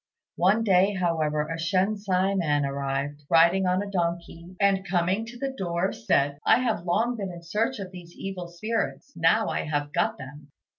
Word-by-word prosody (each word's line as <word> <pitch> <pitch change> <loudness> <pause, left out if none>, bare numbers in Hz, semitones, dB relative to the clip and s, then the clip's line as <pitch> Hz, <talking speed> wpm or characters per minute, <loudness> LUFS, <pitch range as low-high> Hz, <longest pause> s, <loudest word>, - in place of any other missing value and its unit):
One 195 +6 +3
day, 195 -1 +3
however, 160 -4 0
a 165 +1 -4
Shensi 190 +2 +1
man 145 -6 +1
arrived, 140 +1 -3
riding 170 +3 +5
on 185 +2 +1
a 200 - -7
donkey, 170 0 -3
and 200 -1 +3
coming 190 +4 0
to 240 +1 -9
the 270 +2 -3
door 175 -2 -1
said, 140 +5 +1
"I - - +5
have 225 -8 -1
long 225 +8 +1
been 195 -3 -4
in 170 -1 -10
search 225 +9 -1
of 190 -3 -7
these 175 -2 -12
evil 190 -2 -5
spirits: 220 +9 -3
now 165 +7 +3
I - - -2
have 145 -1 -2
got - - +1
them." 140 +2 -11
180 Hz, 180 wpm, -26 LUFS, 165-200 Hz, -, riding